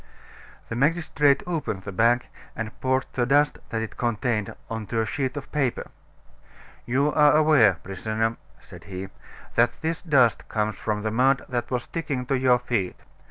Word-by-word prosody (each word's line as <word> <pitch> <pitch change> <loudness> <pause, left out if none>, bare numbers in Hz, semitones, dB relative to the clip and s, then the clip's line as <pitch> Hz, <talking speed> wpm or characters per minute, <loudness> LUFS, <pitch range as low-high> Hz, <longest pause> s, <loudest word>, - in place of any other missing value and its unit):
The 115 - -3
magistrate 150 0 +2
opened 155 - -3
the 100 - -6
bag, 120 +5 +3 0.3
and 115 -1 -4
poured 130 0 +1
the 120 -2 0
dust 145 +2 +3
that 115 -1 -2
it 110 - -8
contained 115 -3 -1
on 110 -2 -5
to 115 - -1
a - - 0
sheet 130 +4 -2
of 140 - -7
paper. 135 -5 -1 1.0
"You 140 +5 +1
are 150 0 +5
aware, 150 - +5
prisoner," 110 +4 -2 0.2
said - - -14
he, 95 0 -6 0.4
"that 120 0 +2
this 160 +1 -2
dust 135 -9 +3
comes 105 -1 -1
from 105 -1 -3
the 110 - -1
mud 130 +4 +2
that 120 -1 -2
was 125 -2 -1
sticking 140 -6 -4
to 135 - 0
your 130 -1 +4
feet. 120 -6 -2
120 Hz, 165 wpm, -25 LUFS, 110-140 Hz, 1.0 s, are